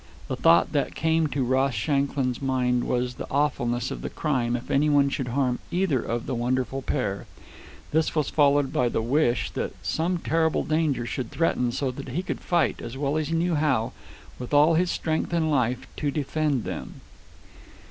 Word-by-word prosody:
The - - -1
thought 85 +1 +4
that 140 -3 -1
came 160 0 +2
into 140 -2 -1
Ross 130 +1 +1
Shanklin's 135 +2 0
mind 125 -2 +1
was 125 0 -1
the - - -8
awfulness 120 -4 0
of - - -5
the - - -4
crime 125 -5 -1
if 120 - -5
any 145 +2 +3
one 140 -1 +4
should 135 -2 -2
harm 125 0 0
either 175 -8 +1
of 115 0 -3
the 135 - -3
wonderful 130 +2 -1
pair. 105 -8 -2 0.6
This 160 +1 +1
was 150 -3 +1
followed 145 -2 +3
by 125 -6 +2
the 115 - -1
wish 120 -3 +1
that - - -4
some 175 +3 0
terrible 160 -1 +1
danger 155 -6 0
should 120 -1 -4
threaten, 125 -7 0
so 130 +2 -1
that 135 +2 -8
he 180 - -2
could - - -4
fight, 175 -1 +1
as 120 - -6
he - - -7
well 140 0 -1
knew 165 +3 0
how, 145 -7 +1 0.5
with 125 +3 -3
all 150 +3 +6
his 175 +2 +2
strength 160 0 -1
and 160 -2 +1
life, 125 -2 0
to 145 - 0
defend 145 -2 -1
them. - - -6
140 Hz, 185 wpm, -25 LUFS, 125-155 Hz, 0.6 s, all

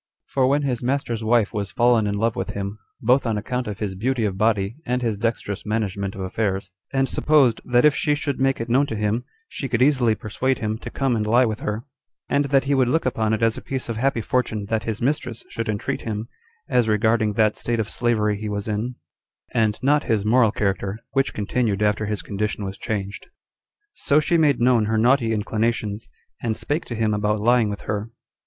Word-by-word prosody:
2. - - -26
For 130 -2 +3
when 145 +2 +2
his 125 -4 -1
master's 120 -3 -1
wife 110 -1 +2
was 100 -3 -2
fallen 120 0 +3
in 100 - -1
love 115 +1 +1
with - - -3
him, 100 +1 -4 0.2
both 125 +2 +3
on 110 -2 0
account 125 +3 -3
of 105 -2 -4
his 105 -3 -3
beauty 115 +4 0
of 100 -3 -1
body, 105 +1 +1
and 125 0 -1
his 115 -3 0
dexterous 105 -2 -2
management 100 -2 -2
of 95 - -6
affairs; 95 0 -2 0.2
and 135 0 +1
supposed, 140 -7 +3
that 120 +2 +3
if 150 - +6
she 150 0 +1
should 145 -3 -3
make 135 0 +2
it 115 - -3
known 135 +4 +3
to 115 - -4
him, 105 +3 0 0.2
she 135 - -5
could 120 - 0
easily 130 -6 +3
persuade 130 +5 -1
him 110 0 -3
to - - -7
come 135 -3 0
and 105 -1 -1
lie 120 +4 +5
with 110 -2 -2
her, 105 +2 -3 0.4
and 145 0 +2
that 135 -1 +3
he 140 +1 0
would 130 -2 +3
look 160 +6 +1
upon 110 -4 0
it 110 +1 0
as 115 -1 +2
a - - -14
piece 130 -2 -4
of 115 - -2
happy 130 -1 +1
fortune 110 -3 -1
that 110 -1 -1
his 115 +1 -3
mistress 125 -4 -1
should 115 -1 -4
entreat 105 -2 -2
him, 110 0 -4 0.4
as 120 -3 +2
regarding 110 0 +2
that 110 0 +2
state 120 -1 -1
of 110 - 0
slavery 110 -3 +1
he 105 +1 -5
was 105 0 -3
in, 110 +4 -2 0.6
and 110 -1 +2
not 145 +2 +3
his 105 -2 0
moral 115 0 +4
character, 100 -1 -1
which 135 0 +1
continued 105 -1 0
after 105 0 +1
his 105 -1 -2
condition 105 0 -2
was 95 0 -5
changed. 100 -1 -4 0.7
So 145 +1 +2
she 160 +3 +1
made 150 -5 +3
known 120 -2 +4
her 110 +1 0
naughty 120 0 +3
inclinations, 110 0 -1 0.3
and 110 -2 -1
spake 150 +4 -2
to 120 - -5
him 110 -1 +1
about 105 0 0
lying 120 0 +3
with 105 - -5
her. 105 +1 -3
115 Hz, 215 wpm, -23 LUFS, 105-125 Hz, 0.7 s, if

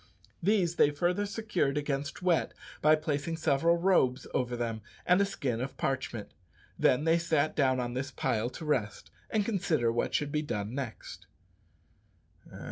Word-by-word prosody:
These 180 -3 +2
they - - +6
further 175 +7 0
secured 195 -9 -1
against 145 +2 -3
wet 175 -3 +1 0.3
by 155 +1 +6
placing 155 +1 -2
several 160 +2 +2
robes 170 -8 +2
over 125 -1 0
them 115 -2 -3 0.2
and 180 +2 +4
a - - +4
skin 125 -11 -2
of 130 +1 -5
parchment. 130 -5 -3 0.5
Then 125 - +3
they 165 +1 +3
sat 155 -3 +1
down 130 -3 +2
on 120 -1 -2
this 135 +2 -3
pile 115 -2 -1
to 160 - -8
rest, 130 -9 -2 0.2
and 215 -2 +1
consider 175 - +1
what 120 - -1
should 145 -1 0
be 150 - 0
done 105 -7 -3
next. 130 -4 -6
145 Hz, 155 wpm, -30 LUFS, 125-170 Hz, 0.5 s, they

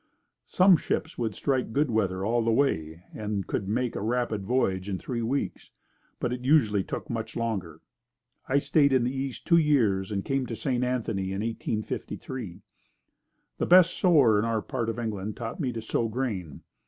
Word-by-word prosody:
Some 185 -1 +5
ships 160 0 -3
would 110 -3 -1
strike 130 -5 -1
good 145 -2 +1
weather 95 -4 0
all 120 +2 +2
the 115 - +2
way 85 - 0
and 105 0 -4
then 100 - -1
could 95 +3 -3
make 120 +3 -1
a - - -3
rapid 115 -2 -1
voyage 95 -4 0
in 95 - -1
three 120 +4 -4
weeks, 130 +5 -2 0.5
but 125 0 -2
usually 125 -7 +4
it 95 - -3
took - - -5
much 115 -1 -4
longer. 95 -9 -3 0.7
I 135 - +3
stayed 140 0 +3
in 130 -2 +3
the 125 +2 -1
east 135 -1 -4
two 170 - +5
years 110 -11 +2
and 100 -2 -2
came 135 -2 -1
to 115 - -4
St. 125 0 -1
Anthony 115 -6 -1
in 95 - -2
1853. 110 -2 -4 1.0
The - - +1
best 180 -1 +6
sower 140 - +5
in 105 - 0
our 115 -2 -1
part 120 -4 -2
of 115 - -3
England 110 -3 -4
taught 115 -2 -5
me 135 -6 -1
to 115 -2 -6
sow 115 +1 0
grain. 110 - -4
115 Hz, 185 wpm, -27 LUFS, 105-130 Hz, 1.0 s, best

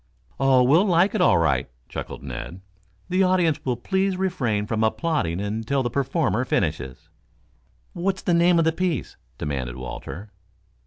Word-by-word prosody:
"Oh, 135 -2 +5
we'll 155 +10 +5
like 180 +2 +3
it - - 0
all 90 - +5
right," 80 -6 +1 0.2
chuckled - - -7
Ned. 70 +7 -7 0.5
"The 185 +1 +2
audience 180 -5 +2
will 125 -2 -1
please 190 +7 0
refrain 130 - -1
from 110 0 -1
applauding 110 - 0
until 110 +7 -1
the 120 - -2
performer 135 -1 0
finishes." 75 - -2 0.9
"What's 190 +2 -2
the 175 - +1
name 170 +1 +4
of 165 - +3
the 160 - +4
piece?" 170 -4 -2 0.2
demanded 65 -4 -3
Walter. 85 - -7
135 Hz, 150 wpm, -24 LUFS, -, 0.9 s, Oh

